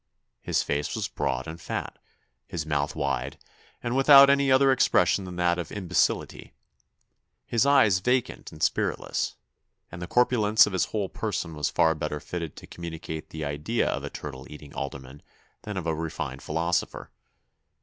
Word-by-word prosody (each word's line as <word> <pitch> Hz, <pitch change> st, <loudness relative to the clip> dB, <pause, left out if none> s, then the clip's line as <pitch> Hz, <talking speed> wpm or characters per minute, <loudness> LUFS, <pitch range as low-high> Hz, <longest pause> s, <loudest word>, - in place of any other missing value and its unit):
His -, -, 0 dB
face 70 Hz, +1 st, -2 dB
was -, -, -2 dB
broad 65 Hz, +1 st, -2 dB
and 80 Hz, +1 st, -8 dB
fat, -, -, -5 dB, 0.5 s
his 80 Hz, -3 st, -4 dB
mouth 75 Hz, -2 st, -1 dB
wide, 65 Hz, +3 st, -2 dB, 0.5 s
and 120 Hz, +1 st, -1 dB
without 140 Hz, 0 st, +8 dB
any 140 Hz, -1 st, +3 dB
other 135 Hz, +1 st, +5 dB
expression 95 Hz, -7 st, +3 dB
than 90 Hz, -1 st, -7 dB
that 90 Hz, 0 st, +1 dB
of 85 Hz, -, -5 dB
imbecility. 90 Hz, -4 st, -1 dB, 0.9 s
His 120 Hz, +3 st, +1 dB
eyes 120 Hz, -10 st, +5 dB
vacant 125 Hz, +4 st, -1 dB
and 75 Hz, -, -7 dB
spiritless; -, -, -1 dB, 0.6 s
and 85 Hz, -, -8 dB
the 85 Hz, -, -5 dB
corpulence 110 Hz, -3 st, +4 dB
of 105 Hz, -, -5 dB
his 95 Hz, -, +2 dB
whole 105 Hz, -3 st, -2 dB
person 90 Hz, -6 st, -3 dB
was 75 Hz, -1 st, -1 dB
far 80 Hz, +1 st, +3 dB
better 75 Hz, -1 st, -4 dB
fitted 85 Hz, -1 st, -6 dB
to -, -, -11 dB
communicate 80 Hz, -2 st, -7 dB
the 80 Hz, -1 st, -5 dB
idea 75 Hz, +11 st, -1 dB
of -, -, -3 dB
a -, -, -4 dB
turtle 65 Hz, -3 st, -8 dB
eating 75 Hz, -1 st, -11 dB
alderman 65 Hz, +1 st, -7 dB, 0.4 s
than 105 Hz, -2 st, -6 dB
of 90 Hz, -, -3 dB
a 80 Hz, -, 0 dB
refined 75 Hz, -4 st, -4 dB
philosopher. 85 Hz, +4 st, -2 dB
85 Hz, 160 wpm, -26 LUFS, 75-110 Hz, 0.9 s, without